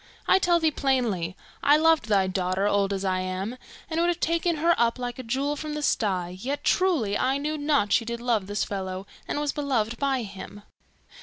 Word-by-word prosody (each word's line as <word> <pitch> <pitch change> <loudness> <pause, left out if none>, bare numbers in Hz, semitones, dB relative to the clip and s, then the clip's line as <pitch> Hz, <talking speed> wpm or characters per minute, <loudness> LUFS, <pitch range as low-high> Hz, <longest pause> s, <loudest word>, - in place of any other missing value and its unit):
I 380 - +5
tell 345 -2 +3
thee 320 -1 +2
plainly, 240 - 0 0.2
I 290 +1 +5
loved 320 -5 +3
thy 200 -3 +3
daughter, 185 +1 -1
old 200 -1 +2
as 195 0 -2
I 185 -1 +1
am, 185 +5 -3 0.3
and 325 0 -2
would 345 - +3
have 350 -1 0
taken 335 +1 +1
her 335 +3 +3
up 235 +1 +1
like 245 0 -5
a - - -5
jewel 270 +5 -1
from 300 +1 -5
the 300 - -3
sty, 185 -9 0
yet, 275 +5 -3
truly, 310 - +2
I 260 +5 +1
knew 300 +2 -2
not 290 -8 +1
that - - +1
she - - +4
did 235 0 -4
love 230 -5 0
this 205 +1 -1
fellow, 190 -1 -4 0.2
and - - -2
was 295 -1 0
beloved 240 -6 -1
by 270 -3 0
him. 205 0 -9
245 Hz, 215 wpm, -26 LUFS, 200-295 Hz, 0.3 s, I